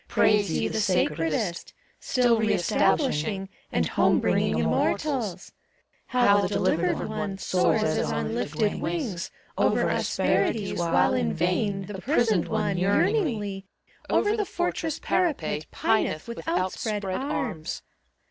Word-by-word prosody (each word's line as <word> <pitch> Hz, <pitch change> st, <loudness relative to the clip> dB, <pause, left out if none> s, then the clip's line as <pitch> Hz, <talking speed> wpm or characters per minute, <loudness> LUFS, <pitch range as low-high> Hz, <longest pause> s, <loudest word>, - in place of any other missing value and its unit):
Praise 210 Hz, -3 st, +3 dB
ye -, -, 0 dB
the 220 Hz, -, -2 dB
sacredest. 170 Hz, -2 st, 0 dB, 0.2 s
Still 245 Hz, -3 st, +2 dB
re 215 Hz, -1 st, +2 dB
establishing 195 Hz, -, +1 dB, 0.2 s
And -, -, +1 dB
home -, -, +3 dB
bringing -, -, +1 dB
Immortals! 230 Hz, -, -1 dB, 0.6 s
How 205 Hz, -5 st, +4 dB
the 195 Hz, -, 0 dB
delivered 180 Hz, -3 st, 0 dB
one 210 Hz, -2 st, -4 dB
Soars 185 Hz, +3 st, +1 dB
as 155 Hz, -, 0 dB
on 75 Hz, 0 st, -2 dB
lifted 150 Hz, -, -1 dB
wings 170 Hz, +1 st, -3 dB, 0.3 s
Over -, -, +2 dB
asperities, 205 Hz, -5 st, 0 dB
while 170 Hz, -1 st, +2 dB
in 80 Hz, -2 st, 0 dB
vain 190 Hz, +2 st, 0 dB
The 195 Hz, -2 st, -7 dB
prisoned 225 Hz, -, +2 dB
one, 210 Hz, -4 st, -1 dB
yearningly, 205 Hz, -, 0 dB, 0.4 s
Over 420 Hz, +1 st, +2 dB
the 430 Hz, -, 0 dB
fortress 350 Hz, -4 st, -2 dB
parapet 295 Hz, -, -1 dB
Pineth 215 Hz, -7 st, 0 dB
with 235 Hz, +6 st, -7 dB
outspread 210 Hz, -, -1 dB
arms! 195 Hz, -, -3 dB
200 Hz, 120 wpm, -26 LUFS, 175-225 Hz, 0.6 s, How